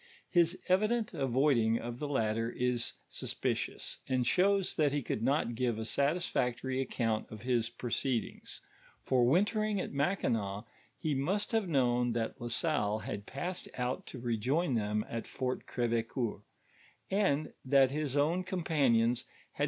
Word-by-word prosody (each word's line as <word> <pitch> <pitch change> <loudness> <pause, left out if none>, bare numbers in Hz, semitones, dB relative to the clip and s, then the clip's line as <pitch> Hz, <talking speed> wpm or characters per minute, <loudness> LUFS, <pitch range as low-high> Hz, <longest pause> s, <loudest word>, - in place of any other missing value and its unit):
His 175 0 +3
evident 215 +4 +2
avoiding 130 -3 +2
of 120 +1 -5
the 150 - -2
latter 115 -4 0
is 125 -1 0
suspicions; - - -3
and 130 -2 +1
shows 195 +5 +3
that 150 -3 +3
he 145 -1 -1
could 110 - -2
not 130 0 +1
give 120 -1 0
a 110 - -3
satisfactory 130 -3 0
no 135 - +1
count 115 -3 -1
of 110 0 -9
his 120 -3 +1
proceedings; 120 0 -3 0.4
for 130 -2 +3
wintering 210 - +2
at - - -4
Mackinaw, 115 - 0 0.3
he 155 - -1
must 185 +10 0
have 220 -5 +1
known 125 -4 +2
that 115 +2 -3
La 120 - -3
Salle 120 -5 0
had 105 -2 -6
passed 175 +7 -4
out 125 0 -2
to - - -7
rejoin 125 +7 0
them 105 -1 0
at 115 0 -5
Fort 130 -1 -3
Crdvecoeur, 115 -2 -1 0.7
and 190 -7 +1
that 135 0 +5
his 145 -1 -1
own 165 +6 +2
companions 135 -10 +2 0.3
had - - -28
br. - - -19
130 Hz, 150 wpm, -32 LUFS, 115-160 Hz, 0.7 s, that